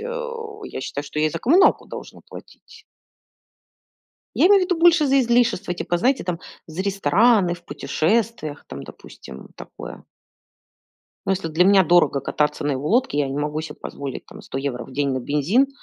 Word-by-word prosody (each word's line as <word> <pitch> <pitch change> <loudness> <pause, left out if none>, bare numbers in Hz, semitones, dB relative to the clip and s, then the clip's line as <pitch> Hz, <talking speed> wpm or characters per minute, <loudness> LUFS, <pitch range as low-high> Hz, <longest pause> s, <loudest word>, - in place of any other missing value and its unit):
э, 485 +1 -5 0.3
я - - -6
считаю, 145 +2 -5
что 150 - -6
я 155 - +3
и - - -1
за - - -4
коммуналку 355 - +4
должна - - -10
платить. - - -14 1.5
Я - - +5
имею 400 -1 +6
в - - +2
виду 360 -2 -1
больше 330 -2 +5
за 275 0 +4
излишества 235 -6 +1
типа, 175 0 -2
знаете, 255 +6 +1
там, 175 -1 -3 0.3
за 160 +2 -6
рестораны, 195 +1 +3
в 170 0 -16
путешествиях, 160 +2 -1
там, - - -8
допустим, 65 - -12
такое. - - -10 1.2
Ну, - - 0
если 190 -3 -1
для 160 +3 +2
меня 195 0 +5
дорого 170 -4 +3
кататься 150 +1 -1
на 145 - +1
его 135 +3 -3
лодке, 240 - +1
я 145 -2 +1
не 135 +2 -4
могу 150 +1 -2
себе 155 -2 -8
позволить 140 -2 -7
там - - -12
100 135 - -6
евро 130 -3 -4
в 135 - -14
день 140 +1 0
на 130 - -2
бензин, 150 - +1
175 Hz, 180 wpm, -22 LUFS, 145-240 Hz, 1.5 s, имею